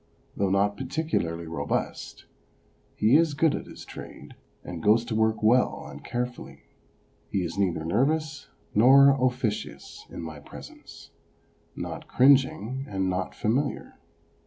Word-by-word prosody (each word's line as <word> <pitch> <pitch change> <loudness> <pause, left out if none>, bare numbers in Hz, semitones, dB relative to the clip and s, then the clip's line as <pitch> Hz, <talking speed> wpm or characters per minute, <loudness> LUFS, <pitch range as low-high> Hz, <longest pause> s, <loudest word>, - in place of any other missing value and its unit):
Though 100 -1 0
not 100 +1 +1
particularly 130 - -2
robust, 75 -3 -4 0.7
he 110 +7 +4
is 160 -3 +2
good 155 0 +3
at - - -5
his - - -11
trade, - - -11 0.3
and 85 -2 -7
goes 110 +6 +4
to 115 - -4
work 110 0 +1
well 125 +4 +3
and - - -10
carefully. 125 0 -5 0.7
He 95 - -1
is 85 -1 -4
neither 90 -5 0
nervous 140 - 0 0.3
nor 135 +5 +7
officious 125 -5 -2
in - - -7
my 80 -2 -7
presence, 70 - -13 0.6
not - - -6
cringing 130 -1 +3
and 95 -2 -1
not 90 0 -3
familiar. 135 +6 -2
115 Hz, 130 wpm, -26 LUFS, 95-135 Hz, 0.7 s, nor